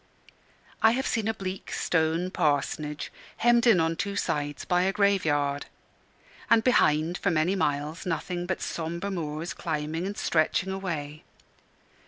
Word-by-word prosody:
I 220 0 +6
have 265 +2 -1
seen 225 -2 0
a 225 - +1
bleak 190 -1 -6
stone 165 +2 0
parsonage, 150 0 -1 0.3
hemmed 240 0 +4
in 215 -7 +6
on 165 0 +1
two 200 +3 -3
sides 145 -6 -2
by 180 0 +2
a 190 +1 +2
grave 200 -2 +2
yard; 145 -1 0 0.8
and 225 -1 +5
behind 165 -8 +3
for 200 - +1
many 165 +3 +2
miles 150 -2 -1
nothing 175 0 -3
but 185 - -2
sombre 170 +4 -3
moors 160 -2 -3
climbing 160 +2 -3
and 205 - -5
stretching 170 +4 +1
away. 155 -6 -4
170 Hz, 145 wpm, -27 LUFS, 155-195 Hz, 0.8 s, I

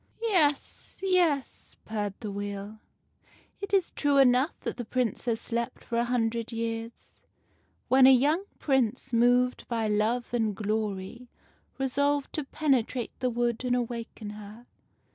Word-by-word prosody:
"Yes, 325 -11 0
yes," 345 -8 0
purred 205 -2 -3
the 210 -3 -4
Wheel, 205 +1 -6 0.8
"it 400 - -5
is 385 -3 +2
true 285 -1 +1
enough 260 +3 +4
that - - -4
the 245 - -3
Princess 235 -1 -1
slept 235 0 -3
for 235 - -2
a 235 - +1
hundred 235 -1 -1
years, 230 0 -5 0.7
when 260 +1 +6
a - - +9
young 295 +9 +3
Prince, 255 -4 0
moved 245 +2 +3
by 225 -2 -1
love 220 +4 0
and 220 -4 0
glory, 215 +2 -3 0.5
resolved 285 +2 0
to 305 - -2
penetrate 260 -5 0
the 255 -1 +1
wood 240 0 -1
and 250 -1 +1
awaken 230 -3 -4
her. 210 +3 -11
240 Hz, 135 wpm, -28 LUFS, 220-265 Hz, 0.8 s, a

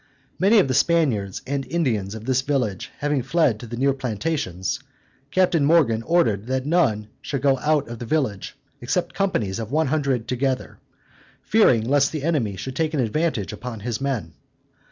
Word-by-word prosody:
Many 200 +5 +5
of 195 - +5
the 130 - 0
Spaniards 130 - +1
and 140 +1 -2
Indians 110 - -1
of 110 0 -8
this 130 0 +2
village 130 -9 -1
having 145 -2 0
fled 135 -4 +1
to 120 - -8
the 120 +1 -6
near 135 +2 +2
plantations, 120 - -2 0.5
Captain 170 0 +2
Morgan 140 -8 +3
ordered 115 - +1
that 130 0 -1
none 135 -11 +2
should 140 -2 -4
go 135 -2 +3
out 150 -1 +1
of 120 -1 -7
the 120 - -6
village, 125 -10 -1 0.2
except - - -1
companies 115 - -1
of 110 +1 -5
one 160 +2 +2
hundred 135 -6 0
together, 130 +1 -2 0.6
fearing 130 - +4
lest 140 +1 +3
the 155 -3 -4
enemy 140 -11 0
should 130 +7 -6
take 160 -1 0
an - - 0
advantage 125 - -1
upon 120 -3 -7
his 120 +2 -3
men. 120 -13 -2
130 Hz, 175 wpm, -23 LUFS, 110-155 Hz, 0.6 s, Many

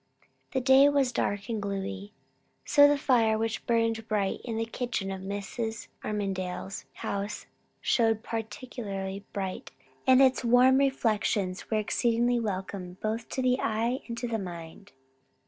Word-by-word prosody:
The 260 - +1
day 265 +2 +7
was 280 -3 +2
dark 205 -4 -1
and 225 -3 -2
gloomy. 200 0 -4 0.5
So 285 -1 +7
the 290 0 +3
fire 235 -6 +3
which 225 0 -2
burned 230 -1 +1
bright 205 -3 0
in 230 -3 -4
the 225 - 0
kitchen 230 -4 -3
of 190 -1 -5
Mrs. 205 +3 -4
Armadale's 195 -2 -3 0.2
house 200 +1 -3 0.4
showed 225 -2 +2
particularly 210 -4 -5
bright, 190 -2 -4 0.4
and 260 0 +7
its 265 -1 +4
warm 250 +2 +5
reflections 215 -8 0
were 220 - +1
exceedingly 235 +3 +1
welcome 190 -3 -4
both 220 +2 -3
to 260 - -2
the 255 +1 +3
eye 230 +4 0
and 235 -1 -5
to 245 - -3
the 225 -1 -1
mind. 175 +2 -8
220 Hz, 145 wpm, -28 LUFS, 200-245 Hz, 0.5 s, day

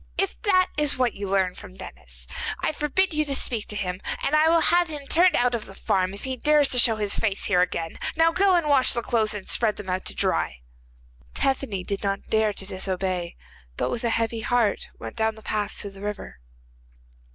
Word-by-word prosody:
If 390 -1 -1
this 370 -4 +4
is 295 -3 +2
what 250 -3 +1
you 200 -1 -5
learn 190 -2 +1
from 185 - -12
Denis, - - -9 0.3
I - - 0
forbid 310 +5 +1
you 305 0 +2
to 280 -2 0
speak 230 -5 -1
to 210 - -7
him, 185 -2 -3 0.2
and 305 - +2
I 310 +1 +5
will 330 0 +4
have 350 +1 +4
him 295 -3 -7
turned 350 +5 +4
out 245 0 +2
of 230 -2 -2
the 195 - -12
farm 190 0 0
if 205 - -11
he 260 -1 -3
dares 295 +1 +3
to 250 - +4
show 230 -2 +5
his 210 -2 +1
face 205 -3 -1
here 180 -3 +3
again. 165 -2 -2 0.2
Now 325 +1 +4
go 380 +2 +3
and 340 -3 +1
wash 275 -3 +4
the 235 - -2
clothes 220 -3 0
and 200 - -7
spread 220 -3 +1
them 190 -3 -6
out 185 +1 -2
to - - -2
dry.' - - 0 0.7
Tephany 260 -8 -1
did 200 +2 -4
not 200 0 -3
dare 220 -1 +3
to 195 - -7
disobey, 185 -2 -3 0.4
but - - -1
with 240 - -4
a 235 - +1
heavy 230 0 0
heart 230 -2 0
went - - -8
down 220 -1 +1
the 220 - -14
path 210 -1 -2
to 200 - -6
the 195 0 -13
river. 205 - -6
220 Hz, 220 wpm, -25 LUFS, 195-290 Hz, 0.7 s, I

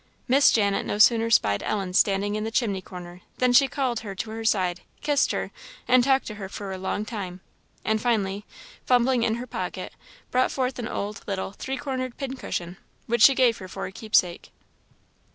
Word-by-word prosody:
Miss 275 +3 +6
Janet 200 -3 +2
no - - -3
sooner 230 +1 +5
spied 100 - +3
Ellen 195 -4 -2
standing 200 +2 +2
in 215 0 -2
the 220 - -2
chimney 220 -5 0
corner, 180 -1 -10 0.2
than 250 -1 +2
she 275 +2 +6
called 260 -4 -1
her 205 -3 -7
to 220 +3 -5
her 225 0 -5
side, 185 -5 +1 0.2
kissed 290 -1 +2
her, - - -3 0.4
and 255 0 +5
talked 265 +1 +3
to 215 - -6
her 195 +1 -6
a 190 - -4
long 200 +3 -2
time, 190 -5 -6 0.5
and 220 0 +1
finally, 205 -4 0 0.4
fumbling 250 0 +3
in 225 -1 +1
her 240 +2 -5
pocket, 185 -5 -5 0.4
brought 255 +1 +2
forth 255 -1 -2
an 230 - -3
old, 200 0 -4
little, 190 -1 -3
three 265 +6 -5
cornered 255 -2 -4
pin 270 -2 -4
cushion, 175 -7 -5 0.3
which 235 0 0
she 270 +4 +8
gave 245 -3 +3
her 185 - -8
for - - -6
a - - -6
keepsake. 190 -4 0
220 Hz, 190 wpm, -25 LUFS, 195-250 Hz, 0.5 s, she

